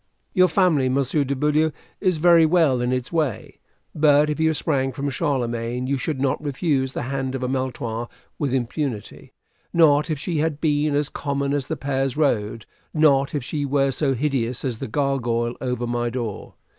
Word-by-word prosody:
Your 185 -2 +5
family, 160 -7 +2
Monsieur 140 +2 +1
de 140 +1 -2
Beaulieu, 150 +3 +2 0.3
is 185 -4 +1
very 170 +1 +6
well 155 -6 +3
in 125 +1 0
its 125 -1 -2
way; 155 - -2 0.3
but 150 0 +4
if 150 - -4
you 160 0 +3
sprang 135 -4 0
from 140 +1 -3
Charlemagne, 125 -5 -1
you 140 +2 0
should 150 0 -2
not 135 +2 0
refuse 135 -2 0
the - - -3
hand 135 0 -3
of 130 - -4
a - - 0
Maletroit 125 -3 -3 0.3
with 145 -4 -1
impunity 125 -3 -3 0.4
not 150 -2 +4
if 155 - -1
she 155 +2 -2
had 155 -1 -1
been 150 -1 +1
as 145 0 +1
common 140 -1 -2
as 140 -2 -1
the 160 - -3
Pairs 135 0 -1
road 115 -7 0 0.3
not 140 -2 +3
if 145 - -2
she 145 +3 -3
were 140 -1 +1
so 135 0 0
hideous 130 -3 -1
as 120 -4 -3
the - - -4
gargoyle 120 -3 0
over 125 -2 -2
my 120 0 -1
door. 115 -4 -5
140 Hz, 180 wpm, -23 LUFS, 125-150 Hz, 0.4 s, very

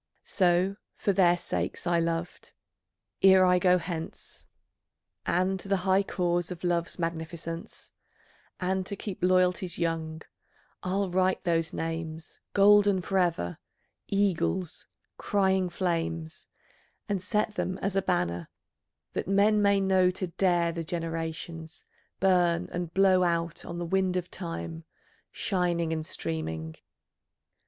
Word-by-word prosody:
So, 185 +1 +2 0.2
for 200 - 0
their 175 -2 +4
sakes - - -3
I 170 -1 +2
loved, 165 +1 -3 0.7
ere 190 -1 +7
I 180 0 +4
go 180 0 +4
hence, 165 -2 -6 0.8
And 185 +2 +1
the 195 +1 0
high 190 +1 +4
cause 175 -3 -1
of 180 -1 -7
Love's 170 -1 0
magnificence, 165 0 -5 0.7
And 185 +1 0
to 200 - -4
keep 195 -1 -7
loyalties 180 0 +2
young, 165 -1 -2 0.6
I'll 190 0 -1
write 185 +1 +1
those 165 -3 +1
names 165 0 -5
Golden 205 -1 +6
for 190 +1 0
ever, 165 - 0 0.5
eagles, 190 -3 0 0.3
crying 190 -2 +1
flames, 165 -3 -2 0.6
And 200 -3 -1
set 210 +2 0
them 185 -3 -2
as 195 0 -2
a 195 - +3
banner, 90 - -1 0.6
that - - -3
men 205 +2 +4
may 200 -1 +4
know, 190 -1 +3
To 185 +1 -2
dare 175 -1 +1
the 165 0 -4
generations, 165 0 -5 0.3
burn, 180 -2 +3
and 175 -2 -3
blow 190 0 +4
Out 170 -2 0
on 170 - -6
the 175 - -3
wind 185 +1 +1
of 180 0 -4
Time, 85 -1 -5 0.5
shining 170 -3 0
and 160 -1 -2
streaming.... 80 - -4
175 Hz, 125 wpm, -28 LUFS, 165-190 Hz, 0.8 s, ere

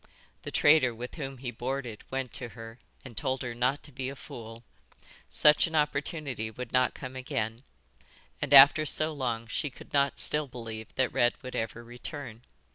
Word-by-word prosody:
The - - -6
trader 145 -6 +5
with 120 +2 -7
whom 135 -4 -6
he 125 -1 -5
boarded 120 -1 -4
went 130 -1 -3
to 125 -2 -5
her 115 +1 -9 0.3
and 125 -3 -10
told 130 +1 -1
her 120 -1 -4
not 125 +4 0
to 145 - -10
be 130 0 -4
a 140 - -7
fool; 115 -2 -10 0.7
such 150 +3 +5
an 165 - -5
opportunity 150 -5 -1
would 120 +2 -8
not 130 0 +3
come 130 -1 -7
again, 125 -4 -3 0.8
and 145 - -2
after 145 +2 +9
so 155 +1 +2
long 120 -5 -2
she 130 +5 -2
could 135 - -15
not 140 -1 +2
still 150 -1 +1
believe 115 -3 -7
that 130 -1 +1
Red 120 0 +3
would 130 - -7
ever 115 +1 -3
return. 120 0 -8
130 Hz, 180 wpm, -29 LUFS, 120-140 Hz, 0.8 s, after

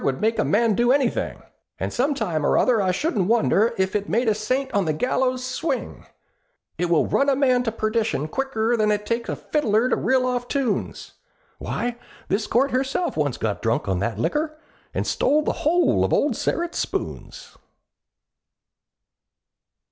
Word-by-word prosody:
Would 135 -1 0
make 225 +1 0
a - - +3
man 225 +1 +2
do 240 +4 +3
anything, 270 -3 0 0.3
And - - -3
some 275 +4 +1
time 175 - -2
or - - +2
other, 240 -4 +3
I 190 - +1
shouldn't 200 - 0
wonder 230 0 +2
If 190 +1 0
it 205 0 -1
made 235 +2 +1
a 220 - +4
saint 255 +6 -2
on 200 -2 +2
the 155 - 0
gallows 255 +7 0
swing; 260 +6 -4 0.7
It 175 - +1
will 165 -3 +3
run 280 - +2
a 275 - +3
man 255 -2 +3
to 225 - 0
perdition 215 - -1
quicker 240 +2 -1
Than 215 -2 +1
it 210 0 0
takes 230 +1 -2
a - - -1
fiddler 245 -5 +1
to - - +2
reel 260 -1 +1
off 245 -1 -1
tunes; 260 -7 -2 0.5
Why, 240 0 -3 0.3
this 205 +3 0
Court 270 +4 +2
herself 270 +7 -1
once 145 -4 -1
got 105 -2 -2
drunk 115 -2 0
on 95 -2 0
that 115 +4 -2
liquor, 305 - -1 0.3
And - - -2
stole 300 +2 +2
the - - 0
whole 345 +4 +3
of - - 0
old 290 -3 +2
Sterret's 345 +8 -2
spoons!" - - -5
235 Hz, 175 wpm, -23 LUFS, 205-265 Hz, 0.7 s, a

